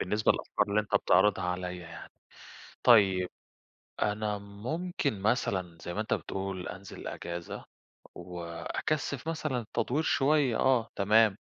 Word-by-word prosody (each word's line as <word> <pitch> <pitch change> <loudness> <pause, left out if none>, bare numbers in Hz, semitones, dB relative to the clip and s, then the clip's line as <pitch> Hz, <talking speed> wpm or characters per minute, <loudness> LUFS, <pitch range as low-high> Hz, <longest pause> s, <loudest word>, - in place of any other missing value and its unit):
بالنسبة 105 +3 +2
للأفكار 105 - -1
اللي 105 +1 +3
أنت 105 - -6
بتعرضها 100 -1 +3
عليَّ 90 0 -3
يعني، 85 -1 -10 0.7
طيّب 95 -6 +5 0.7
أنا 105 0 -1
ممكن 125 - -3
مثلًا 95 -6 0
زي 85 - -5
ما 105 - -1
أنت 110 - -1
بتقول 95 -1 -4
أنزل 95 +1 -8
أجازة، 85 0 -6 0.5
وأكثِّف 90 - -3
مثلًا 150 -7 -2
تدوير 145 +6 +1
شويّة، 140 -5 +3
آه 125 -4 +3
تمام، 105 +1 +4
105 Hz, 120 wpm, -30 LUFS, 90-125 Hz, 0.7 s, طيّب